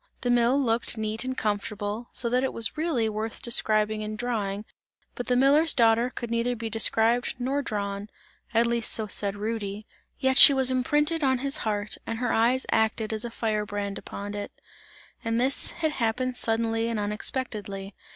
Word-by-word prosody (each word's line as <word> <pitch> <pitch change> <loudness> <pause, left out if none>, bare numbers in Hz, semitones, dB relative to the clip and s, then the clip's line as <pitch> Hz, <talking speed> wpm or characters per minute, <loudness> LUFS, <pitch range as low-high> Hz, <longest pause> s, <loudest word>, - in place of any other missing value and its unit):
The 245 - 0
mill 245 +3 +3
looked 235 -2 +1
neat 220 +1 -1
and 260 0 -4
comfortable, 210 +2 -3
so 240 - +1
that 250 +2 +1
it 265 - -1
was 230 -1 -1
really 305 -8 0
worth 220 +1 -5
describing 215 -2 +2
and 215 0 -5
drawing, 210 -4 -3 0.5
but 245 - -6
the 250 - +2
miller's 285 +5 +4
daughter 230 +1 +3
could 235 -2 -7
neither 235 +1 0
be 225 -1 -5
described 225 +2 +2
nor 265 +3 -1
drawn, 200 -4 -4 0.4
at 230 +1 +3
least 235 -1 0
so 220 - 0
said 200 0 -1
Rudy. 210 -1 -4 0.3
Yet 265 -1 +2
she 280 - +11
was 260 -1 +5
imprinted 295 +5 +1
in 265 -2 +2
his 275 +3 0
heart, 210 -5 -2
and 225 - -3
her 245 0 -1
eyes 240 +3 +2
acted 220 0 0
as 220 +1 -4
a - - -4
fire 220 -2 -2
brand 205 -1 -4
upon 205 +1 -7
it, 205 0 -5 0.7
and 230 0 0
this 265 +3 +2
had 315 -2 -2
happened 255 0 -1
suddenly 225 -1 0
and 230 -2 -2
unexpectedly. 205 -2 -4
230 Hz, 180 wpm, -26 LUFS, 215-250 Hz, 0.7 s, she